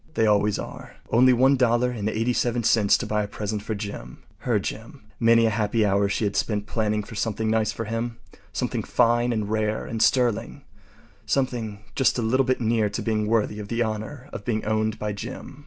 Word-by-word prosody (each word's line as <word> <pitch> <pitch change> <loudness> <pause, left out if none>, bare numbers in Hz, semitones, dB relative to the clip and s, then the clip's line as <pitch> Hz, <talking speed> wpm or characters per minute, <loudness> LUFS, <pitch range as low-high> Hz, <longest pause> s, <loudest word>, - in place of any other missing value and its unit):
They 110 - +3
always 105 -1 +3
are. - - -8 0.2
Only 125 +3 +6
$1.87 120 -3 +2
to - - -4
buy 105 0 0
a 105 - -3
present 105 0 -4
for 110 +1 -4
Jim. 100 - -7 0.2
Her - - +1
Jim. - - -6 0.2
Many 115 0 +5
a 110 - +2
happy 110 +1 +1
hour 100 0 +2
she 100 - -1
had 100 -1 -1
spent 105 -2 -1
planning 105 -2 -1
for 115 - -11
something 110 +1 -1
nice 110 -1 +1
for 115 - -5
him. 115 +2 -3 0.3
Something - - -2
fine 120 0 +2
and 110 -3 -1
rare 110 0 -1
and 115 -1 -4
sterling—something 115 -1 -2
just 130 - +2
a 120 - -1
little 130 +4 +2
bit 130 - +1
near 110 -2 +1
to - - -4
being 110 -2 0
worthy 105 -1 +1
of 105 - -6
the 115 +2 0
honor 110 +5 -5
of - - -6
being 110 0 -2
owned 110 0 0
by 105 -1 -3
Jim. 115 +6 -8
110 Hz, 185 wpm, -24 LUFS, 105-120 Hz, 0.3 s, Only